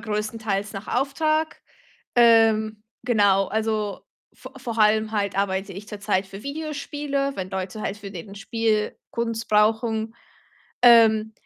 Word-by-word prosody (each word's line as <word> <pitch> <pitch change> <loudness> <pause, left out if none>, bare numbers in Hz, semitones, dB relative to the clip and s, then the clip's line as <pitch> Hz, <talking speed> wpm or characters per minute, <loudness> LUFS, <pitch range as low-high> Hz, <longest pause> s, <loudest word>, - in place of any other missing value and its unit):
größtenteils 210 -2 -3
nach 195 0 -8
Auftrag. 310 +4 0 0.5
Ähm, 220 -2 +4 0.2
genau, 205 -5 +3
also, 215 -1 -2 0.3
vo 255 - -12
vor 235 -3 -5
allem 215 +1 +3
halt 200 -2 -1
arbeite 195 -1 -1
ich 205 +2 -9
zurzeit 205 -2 -2
für 195 +2 -10
Videospiele, 285 -1 -3
wenn 185 0 -5
Leute 190 +3 -5
halt 205 +1 -3
für 200 -1 -9
den 195 +2 -9
Spiel 215 +1 -1
Kunst 230 -1 -3
brauchen. 220 +1 +1 0.7
Ähm, 220 -2 +6
220 Hz, 125 wpm, -24 LUFS, 205-235 Hz, 0.7 s, Ähm